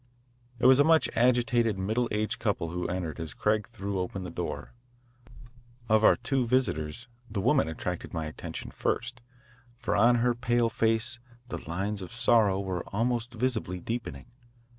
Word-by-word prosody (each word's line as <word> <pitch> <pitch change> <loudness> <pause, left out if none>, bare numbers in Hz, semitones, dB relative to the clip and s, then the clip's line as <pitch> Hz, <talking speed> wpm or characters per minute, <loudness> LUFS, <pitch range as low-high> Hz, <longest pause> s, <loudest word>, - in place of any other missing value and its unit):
It 125 - -1
was 130 +1 +7
a - - +7
much 160 0 +4
agitated 120 -2 +3
middle 110 +6 0
aged 110 +2 -2
couple 100 -7 -1
who 90 +1 -2
entered 85 -3 -3
as 80 -1 -6
Craig 105 0 +1
threw 100 -4 -4
open 90 +1 -3
the 90 - -6
door. - - -5 1.1
Of 110 0 +4
our - - +7
two 135 -2 0
visitors, 120 - -1 0.2
the 105 -1 -3
woman 95 - +3
attracted 80 - -4
my 80 -1 -3
attention 75 - -7
first, 120 0 -2 0.6
for 120 -1 -1
on 120 +1 +5
her 120 +1 +2
pale 120 0 +1
face 115 +2 0 0.3
the - - -4
lines 100 +4 -2
of 90 - -8
sorrow 110 -5 +4
were 95 -3 -3
almost 120 +2 -1
visibly 110 -7 -1
deepening. 115 +5 -5
110 Hz, 160 wpm, -28 LUFS, 95-120 Hz, 1.1 s, was